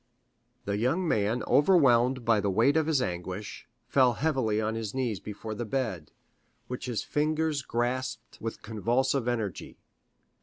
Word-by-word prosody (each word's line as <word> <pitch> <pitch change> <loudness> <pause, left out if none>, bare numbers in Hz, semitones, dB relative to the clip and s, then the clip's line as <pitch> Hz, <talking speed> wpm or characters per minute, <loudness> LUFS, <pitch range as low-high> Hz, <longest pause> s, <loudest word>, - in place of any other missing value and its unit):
The 100 0 -1
young 155 +11 +1
man 110 -1 +1
overwhelmed 130 -7 +4
by 115 -2 +4
the 100 - 0
weight 115 +9 +3
of 160 -1 +2
his 145 -5 +2
anguish, 90 +1 -5 0.2
fell 130 -3 +4
heavily 130 -5 0
on 110 0 -1
his 110 0 -4
knees 120 -7 -1
before 105 +4 -7
the 110 - -4
bed, 110 - -3 0.6
which 125 0 -6
his 120 -3 -2
fingers 155 0 0
grasped 125 0 -3
with 115 0 -5
convulsive 120 +4 0
energy. 110 -6 -3
120 Hz, 145 wpm, -28 LUFS, 110-135 Hz, 0.6 s, overwhelmed